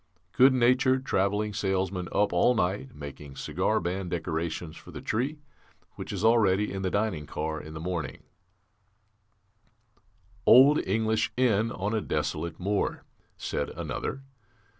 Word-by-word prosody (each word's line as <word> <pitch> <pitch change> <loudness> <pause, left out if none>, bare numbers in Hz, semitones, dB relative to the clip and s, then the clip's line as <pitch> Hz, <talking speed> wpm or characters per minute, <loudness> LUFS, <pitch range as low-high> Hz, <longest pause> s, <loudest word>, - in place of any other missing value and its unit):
Good 130 +6 +6
natured 130 +1 +3
travelling 105 +1 0
salesman 95 -3 -1
up 105 -2 +1
all 90 +8 +4
night, 105 +6 -1
making 70 -1 -9
cigar - - 0
band 90 +2 -3
decorations 80 -1 -3
for - - -13
the - - -7
Tree, 135 +8 -2 0.6
which - - -7
is - - -4
all 115 +1 +5
ready 100 0 +2
in 95 - -3
the 95 - 0
dining 95 -7 -1
car 80 0 -3
in 80 +1 -10
the - - -5
morning 85 -1 -4 1.0
" 105 +1 -37
"Old 135 +5 +7
English 110 +2 +1
inn 115 -3 +2
on 105 +1 -3
a 110 - +1
desolate 80 +1 -3
moor," 100 +2 -1 0.3
said - - -3
another. 135 - -4
100 Hz, 140 wpm, -28 LUFS, 90-110 Hz, 1.0 s, Old